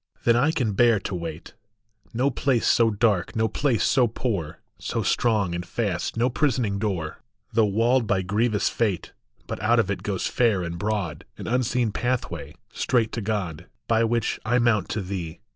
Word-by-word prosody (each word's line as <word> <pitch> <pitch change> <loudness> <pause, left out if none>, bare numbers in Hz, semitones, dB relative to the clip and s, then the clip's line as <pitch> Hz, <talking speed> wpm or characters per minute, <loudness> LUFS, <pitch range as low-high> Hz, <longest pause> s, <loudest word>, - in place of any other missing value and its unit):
Then 115 - +4
I 130 +6 +3
can 125 - 0
bear 115 0 +4
to 105 - -5
wait! 85 -1 -6 0.6
No 130 +4 +1
place 125 -1 +1
so 115 -1 +4
dark, 105 -3 +1
no 110 0 +2
place 115 0 0
so 125 -2 +4
poor, 100 -9 -3 0.2
So - - -2
strong 105 -7 +1
and 85 0 -3
fast 95 +2 -2
no 120 +2 +3
prisoning 120 -6 0
door, 95 -7 -2 0.3
Though 110 -1 +4
walled 115 +4 +2
by 95 -2 +1
grievous 105 +3 +1
fate, 105 -7 -1 0.3
But - - -5
out 115 +3 +3
of 100 -4 +1
it 95 -2 -3
goes 95 -2 -2
fair 110 -7 +2
and 85 0 -5
broad 100 -6 -2
An - - -7
unseen 125 -1 +1
pathway, 125 +3 -3 0.2
straight 115 -4 +1
to 115 - -3
God, 100 -7 -3 0.2
By 115 0 +3
which 115 -1 0
I 120 +2 +2
mount 115 -6 +2
to 110 - -2
thee. 90 -3 -5
110 Hz, 175 wpm, -25 LUFS, 95-120 Hz, 0.6 s, Then